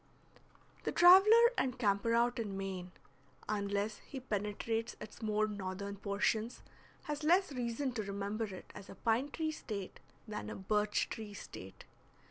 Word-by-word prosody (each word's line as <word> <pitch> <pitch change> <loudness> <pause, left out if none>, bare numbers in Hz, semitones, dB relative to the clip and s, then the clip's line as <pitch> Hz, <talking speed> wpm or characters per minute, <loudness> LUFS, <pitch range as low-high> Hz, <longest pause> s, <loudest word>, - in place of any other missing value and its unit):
The - - -1
traveler 425 +7 +8
and 255 -1 0
camper 215 0 +2
out 240 +1 +2
in 205 -4 -3
Maine, 190 -2 -4 0.6
unless 205 0 -1
he 270 - -8
penetrates 225 0 -2
its 215 - -10
more 215 -1 +1
northern 200 0 -5
portions, 205 +3 -1 0.4
has 295 0 -4
less 355 +3 +4
reason 250 +1 -2
to 235 -3 -2
remember 200 +2 -3
it 190 -3 -9
as 195 - -10
a - - -9
pine 235 +5 +1
tree 315 +1 -2
State 205 -10 -6 0.3
than 210 -1 -5
a - - -5
birch 210 +2 +1
tree 215 -2 -6
State. 95 - -10
215 Hz, 145 wpm, -34 LUFS, 200-250 Hz, 0.6 s, traveler